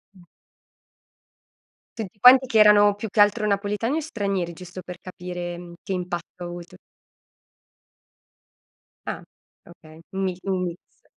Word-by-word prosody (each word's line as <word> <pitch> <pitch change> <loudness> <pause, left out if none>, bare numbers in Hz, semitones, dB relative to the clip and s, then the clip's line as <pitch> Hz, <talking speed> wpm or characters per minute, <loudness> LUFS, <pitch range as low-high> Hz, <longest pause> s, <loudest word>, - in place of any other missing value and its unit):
Mh. 180 - -17 1.7
Tutti 205 -1 -7
quanti, 260 +3 +8
che 220 -3 +2
erano 205 -1 +7
più 210 +1 -6
che 210 - -3
altro 210 +1 +4
napoletani 210 +7 0
o - - +1
stranieri? 200 - -2
Giusto 180 +2 -9
per 180 0 -9
capire, 175 -1 -6
mhmm, 175 -1 -10
che - - -6
impatto 175 0 -5
ha - - -4
avuto. 175 0 -9 2.3
Ah, - - -5 0.4
okay, 160 -2 -16
un 195 0 -2
mi 185 -2 -2
un 190 -2 0
mix. 175 0 -10
185 Hz, 135 wpm, -24 LUFS, 175-210 Hz, 2.3 s, quanti